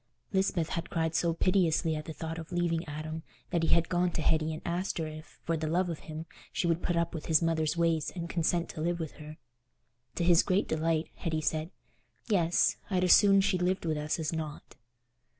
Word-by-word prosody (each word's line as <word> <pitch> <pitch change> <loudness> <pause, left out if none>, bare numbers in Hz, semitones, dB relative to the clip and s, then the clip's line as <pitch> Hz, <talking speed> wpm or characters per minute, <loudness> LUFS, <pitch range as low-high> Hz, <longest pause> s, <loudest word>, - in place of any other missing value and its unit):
Lisbeth 190 -4 +1
had 170 - -3
cried 160 -1 0
so 170 +1 +2
piteously 165 -3 +2
at 155 0 -5
the 160 - -6
thought 165 +1 -5
of 165 +2 -9
leaving 170 -1 0
Adam 155 +2 -5 0.3
that 170 -3 +1
he 165 - +1
had 170 0 +3
gone 175 0 +1
to 160 - -2
Hetty 155 0 +2
and 155 - -6
asked 175 +3 -2
her 165 - -1
if, 155 0 -10
for 165 - 0
the 160 0 -2
love 175 +2 +1
of 160 - -5
him, 155 +1 -5 0.3
she - - -1
would 170 0 +1
put 175 - 0
up 170 0 0
with 160 - -6
his 160 0 +4
mother's 160 0 +1
ways 165 -2 +1
and 170 -2 -4
consent 170 0 0
to 155 - -6
live 170 +1 0
with 160 -3 -4
her. 155 0 -10 0.8
To - - -1
his 170 -1 +6
great 190 +2 +1
delight, 160 0 0
Hetty 160 -2 -2
said, 155 +1 -1 0.6
"Yes; 175 -6 +3
I'd 185 -2 +1
as 180 - +7
soon 195 -1 +6
she 190 -1 +1
lived 180 0 0
with 160 -1 0
us 150 0 -1
as 160 -1 -2
not." 155 -5 -6
165 Hz, 220 wpm, -30 LUFS, 155-175 Hz, 0.8 s, as